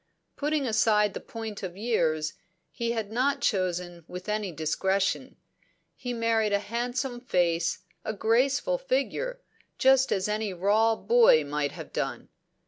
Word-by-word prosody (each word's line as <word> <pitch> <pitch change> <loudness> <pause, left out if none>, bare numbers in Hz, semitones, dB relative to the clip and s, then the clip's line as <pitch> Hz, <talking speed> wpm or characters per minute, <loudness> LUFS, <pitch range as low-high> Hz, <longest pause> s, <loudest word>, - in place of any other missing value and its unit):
Putting 295 -1 0
aside 215 -2 +3
the - - -4
point 225 -3 -7
of 185 -1 -6
years, 165 -8 0 0.4
he 235 0 -2
had 220 -3 -3
not 260 +5 +1
chosen 180 -3 -1
with 180 +2 -8
any 210 -2 -1
discretion; 190 +5 -1 0.6
he 250 -1 -5
married 230 -3 +1
a - - +5
handsome 245 +4 -3
face, 175 -7 0 0.2
a - - -2
graceful 260 - +1
figure, - - -1 0.4
just 265 0 +4
as 190 0 +1
any 210 -1 -1
raw 210 +5 +3
boy 460 - +5
might 145 0 -2
have - - -9
done. - - -3
215 Hz, 135 wpm, -27 LUFS, 185-245 Hz, 0.6 s, a